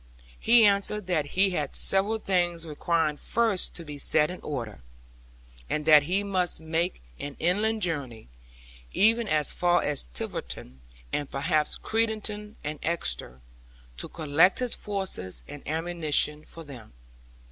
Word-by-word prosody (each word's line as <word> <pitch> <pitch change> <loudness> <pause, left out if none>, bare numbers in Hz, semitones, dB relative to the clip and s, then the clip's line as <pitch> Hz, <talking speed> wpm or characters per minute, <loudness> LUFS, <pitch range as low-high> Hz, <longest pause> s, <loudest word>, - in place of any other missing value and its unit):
He 230 -1 +6
answered 200 0 +2
that 165 -5 0
he 195 0 +4
had 150 -6 -3
several 200 +3 +2
things 175 -5 0
requiring 155 0 0
first 225 -1 0
to 170 - -7
be 145 -1 -8
set 150 +3 +2
in 180 - -8
order, 120 -8 -5 0.9
and 150 0 -2
that 155 -1 +8
he 185 +7 -1
must 185 -3 +1
make 160 - -2 0.2
an 145 -1 -6
inland 210 +5 +1
Journey, 140 - -2 0.7
even 225 +2 +4
as 150 -4 +3
far 175 0 +2
as 145 - 0
Tiverton, 60 +1 -6 0.3
and 145 -2 -2
perhaps 150 +2 0
Crediton 215 -1 -2
and 150 0 -4
Exeter, 65 - -3 0.6
to - - -3
collect 160 +3 +3
his 250 -2 +1
forces 190 - -3
and 145 0 -9
ammunition 155 -2 +1
for 165 - -10
them. 125 - -12
165 Hz, 135 wpm, -27 LUFS, 145-195 Hz, 0.9 s, that